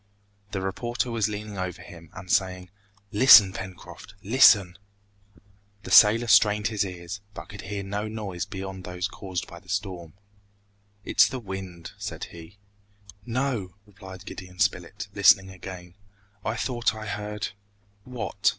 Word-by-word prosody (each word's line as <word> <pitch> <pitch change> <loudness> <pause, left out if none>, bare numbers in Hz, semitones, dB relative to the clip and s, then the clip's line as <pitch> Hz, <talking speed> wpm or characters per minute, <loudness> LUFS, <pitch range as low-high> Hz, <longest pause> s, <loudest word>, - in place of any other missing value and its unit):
The 95 -1 -4
reporter 120 +6 -2
was 110 -2 0
leaning 105 -1 -6
over 95 -1 -4
him, 85 -1 -13
and 95 -1 -8
saying, 90 -1 0 0.4
"Listen, 105 -4 +8
Pencroft, 95 0 -9
listen!" 100 -5 +5 1.0
The - - -8
sailor 115 +3 +7
strained 105 0 +4
his 105 -3 0
ears, 90 +1 -7
but - - -9
could 100 0 -9
hear 100 0 -5
no 100 +2 -3
noise 100 -4 -5
beyond 95 -2 -7
those 90 0 -3
caused 95 -3 -5
by 85 -2 -12
the 95 - -22
storm. 90 -5 -4 0.9
"It - - +2
is 105 - +8
the 130 - -5
wind," 95 -5 -7
said - - -6
he. 85 +3 -12 0.7
"No," 120 -7 -2
replied 95 -2 -12
Gideon 90 -1 -9
Spilett, - - -1
listening 95 0 +5
again, 90 -1 -10 0.5
"I - - -2
thought 120 -3 -1
I 110 0 -7
heard 105 0 -4 0.3
" 100 0 -38
"What?" 120 -4 -1
95 Hz, 145 wpm, -26 LUFS, 90-105 Hz, 1.0 s, Listen